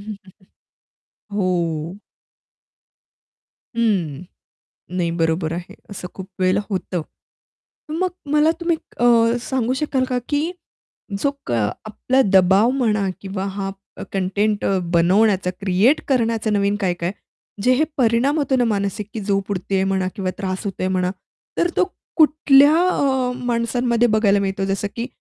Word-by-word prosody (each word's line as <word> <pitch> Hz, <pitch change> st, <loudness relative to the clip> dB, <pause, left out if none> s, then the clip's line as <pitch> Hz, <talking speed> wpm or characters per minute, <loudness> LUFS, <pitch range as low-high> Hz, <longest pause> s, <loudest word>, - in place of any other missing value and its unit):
हं, 210 Hz, -, -5 dB
हं. -, -, -14 dB, 1.1 s
हो. 175 Hz, -2 st, -1 dB, 1.8 s
हं, 180 Hz, -10 st, 0 dB, 0.7 s
नाही, 175 Hz, -2 st, 0 dB
बरोबर 160 Hz, 0 st, 0 dB
आहे. 175 Hz, +1 st, -6 dB, 0.2 s
असं 180 Hz, -2 st, -7 dB
खूप 190 Hz, 0 st, -8 dB
वेळेला 185 Hz, +2 st, +3 dB
होतं. 185 Hz, -2 st, -2 dB, 0.9 s
मग 360 Hz, +4 st, 0 dB, 0.2 s
मला 300 Hz, +2 st, +4 dB
तुम्ही 340 Hz, -1 st, +1 dB, 0.2 s
अ, 240 Hz, -, +1 dB, 0.4 s
सांगू 255 Hz, -1 st, -1 dB
शकाल 270 Hz, -3 st, 0 dB
का 250 Hz, -, 0 dB
की 305 Hz, +4 st, 0 dB, 0.7 s
जो 280 Hz, -, +2 dB
का 120 Hz, -2 st, -1 dB, 0.3 s
आपला 260 Hz, +5 st, +1 dB
दबाव 190 Hz, +4 st, +5 dB
म्हणा 215 Hz, -7 st, +1 dB
किंवा 195 Hz, 0 st, -4 dB
हा 195 Hz, -1 st, -3 dB, 0.3 s
अ, -, -, -6 dB
कंटेंट 200 Hz, +2 st, 0 dB
अ, 195 Hz, -, +2 dB, 0.2 s
बनवण्याचा 185 Hz, +2 st, +3 dB
क्रिएट 200 Hz, +9 st, +3 dB
करण्याचा 230 Hz, -4 st, +1 dB
नवीन 200 Hz, 0 st, +1 dB
काय-काय 175 Hz, -1 st, -1 dB, 0.5 s
जे 250 Hz, -, +4 dB
हे 295 Hz, -, +3 dB
परिणाम 255 Hz, +4 st, +2 dB
होतो 280 Hz, -3 st, +1 dB
ना 250 Hz, -, +3 dB
मानसिक 205 Hz, 0 st, -2 dB
झोप 195 Hz, -1 st, -1 dB
उडतेय 190 Hz, 0 st, -1 dB
म्हणा 190 Hz, -1 st, 0 dB
किंवा 190 Hz, -3 st, -2 dB
त्रास 185 Hz, -1 st, -3 dB
होतोय 185 Hz, -1 st, -2 dB
म्हणा. 185 Hz, -1 st, 0 dB, 0.5 s
तर 345 Hz, -, +2 dB
तो -, -, +5 dB, 0.3 s
कुठल्या 300 Hz, -2 st, +6 dB, 0.2 s
अ, 265 Hz, -6 st, +1 dB
माणसांमध्ये 235 Hz, 0 st, +1 dB
बघायला 205 Hz, -2 st, +3 dB
मिळतो? 195 Hz, 0 st, -1 dB
जसं 195 Hz, +1 st, -1 dB
की 235 Hz, +2 st, -3 dB
205 Hz, 135 wpm, -21 LUFS, 185-250 Hz, 1.8 s, कुठल्या